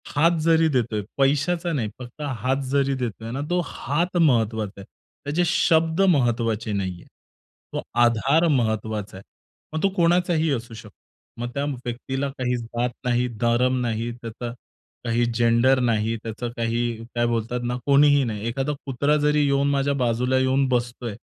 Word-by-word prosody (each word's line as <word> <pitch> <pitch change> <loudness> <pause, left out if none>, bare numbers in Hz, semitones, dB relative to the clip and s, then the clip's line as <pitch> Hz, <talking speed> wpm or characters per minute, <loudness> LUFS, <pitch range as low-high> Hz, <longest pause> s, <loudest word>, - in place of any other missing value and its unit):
हात 165 +3 +4
जरी 165 0 +4
देतोय, 115 -6 0 0.2
पैशाचा 150 +6 +1
नाही 115 -7 -1
फक्त 125 +4 -10 0.2
हात 130 +5 0
जरी 140 -1 +2
देतोय 115 -2 -4
ना, 135 - -3
तो 180 0 +2
हात 170 +7 -2
महत्त्वाचा 110 - +1
आहे. - - -11 0.4
त्याचे 155 +5 +1
शब्द 165 0 +2
महत्त्वाचे 120 - +2
नाहीये. 95 -3 -3 0.7
तो - - -2 0.2
आधार 135 +8 +3
महत्त्वाचा 110 -6 -1
आहे. 95 - -11 0.5
मग 160 - -2
तो 195 - +4
कोणाचाही 170 -2 +2
असू 115 -2 -5
शकतो. 110 -2 -12 0.5
मग 120 - -3
त्या 140 - -2 0.2
व्यक्तीला 130 +3 -3
काही 125 -1 0
जात 120 +1 -2 0.2
नाही, 125 0 +1
धर्म 125 +2 +2
नाही, 115 0 -2
त्याचा 115 +1 -6 0.5
काही 120 +1 +1
जेंडर 120 +3 +4
नाही, 115 -2 +1
त्याचं 115 +2 -4
काही 115 0 0 0.3
काय 120 0 +2
बोलतात 120 +1 -1
ना 120 0 -1
कोणीही 145 0 +5
नाही. 110 -1 -3
एखादा 135 +5 -1
कुत्रा 140 +3 +1
जरी 150 0 +2
येऊन 140 0 +2
माझ्या 140 0 +1
बाजूला 125 0 +1
येऊन 130 +1 +2
बसतोय. 120 -2 -2
125 Hz, 150 wpm, -24 LUFS, 115-145 Hz, 0.7 s, कोणीही